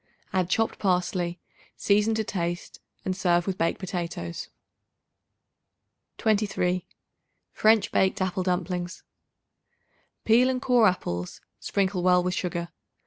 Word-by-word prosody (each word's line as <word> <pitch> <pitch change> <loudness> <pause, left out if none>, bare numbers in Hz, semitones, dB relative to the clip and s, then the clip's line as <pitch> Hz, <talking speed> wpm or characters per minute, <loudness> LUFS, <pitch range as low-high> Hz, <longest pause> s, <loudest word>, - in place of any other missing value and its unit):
Add 185 -2 +1
chopped 225 +3 0
parsley; 180 -2 0 0.4
season 210 +2 +2
to 220 - 0
taste 175 -3 -4 0.3
and 185 - -1
serve 175 -2 +2
with 190 -1 -3
baked 165 - +1
potatoes. 170 - -5 1.7
23. 200 -5 0 0.7
French 220 -1 +3
Baked 190 - +2
Apple 185 -1 -1
Dumplings. 180 -1 -2 1.2
Peel 240 +3 +5
and 255 -1 0
core 245 -4 +4
apples; 90 - -2 0.2
sprinkle 190 -2 0
well 180 0 +4
with 180 0 -1
sugar. 170 -2 -3
185 Hz, 110 wpm, -26 LUFS, 175-205 Hz, 1.7 s, Peel